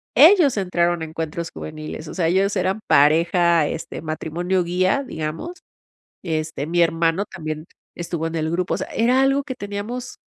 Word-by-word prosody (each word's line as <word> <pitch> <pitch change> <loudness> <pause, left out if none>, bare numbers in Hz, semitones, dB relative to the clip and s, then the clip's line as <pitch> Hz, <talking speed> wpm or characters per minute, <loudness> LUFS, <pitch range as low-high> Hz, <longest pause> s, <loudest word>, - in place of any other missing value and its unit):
ellos 315 - +7
entraron 175 -3 +1
a - - -2
Encuentros 160 +1 -5
Juveniles. 155 0 -7
O - - -7
sea, 170 -3 0
ellos 195 +3 +2
eran 195 +3 0
pareja, 165 +2 +4
este, 165 - -5
matrimonio 170 +3 -1
guía, 185 +10 +1
digamos, 165 - -5 0.7
este, 155 -3 -2
mi 175 +2 +2
hermano 165 +3 +1
también 155 -4 -6 0.3
estuvo 170 -1 -3
en 165 - -8
el 155 0 -1
grupo. 180 +2 -1
O - - 0
sea, - - -4
era 250 +3 +2
algo 275 +1 +3
que 260 -3 -5
teníamos 230 +3 -6
170 Hz, 165 wpm, -22 LUFS, 160-200 Hz, 0.7 s, ellos